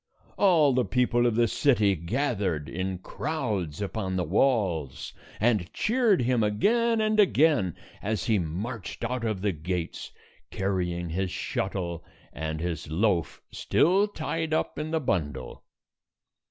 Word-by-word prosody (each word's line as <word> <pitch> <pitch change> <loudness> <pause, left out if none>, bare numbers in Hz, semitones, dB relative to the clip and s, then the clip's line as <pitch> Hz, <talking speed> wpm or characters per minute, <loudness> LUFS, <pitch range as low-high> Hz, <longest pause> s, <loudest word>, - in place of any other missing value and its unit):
All 165 -8 +4
the 125 0 +2
people 120 -1 +2
of 115 - 0
the 120 0 +3
city 110 -7 +3
gathered 95 - -1
in 95 +1 -3
crowds 105 - -3
upon 95 -2 -3
the 90 - 0
walls, 90 - 0 0.3
and 105 -6 +1
cheered 220 - +2
him 125 -1 +2
again 225 - +2
and 215 0 +1
again 150 - +3 0.3
as 105 -3 -1
he 110 -3 +2
marched 95 +8 -5
out 125 +1 -2
of 110 -4 -1
the 105 0 +1
gates, 85 +1 -4 0.4
carrying 90 -3 -2
his 95 +3 -1
shuttle 90 -2 -3 0.3
and 80 +2 -4
his 85 -2 -4
loaf 85 -2 0
still 190 +6 +3
tied 160 -4 -2
up - - -2
in 155 +1 -3
the 160 0 0
bundle. 75 - -3
105 Hz, 135 wpm, -27 LUFS, 90-135 Hz, 0.4 s, All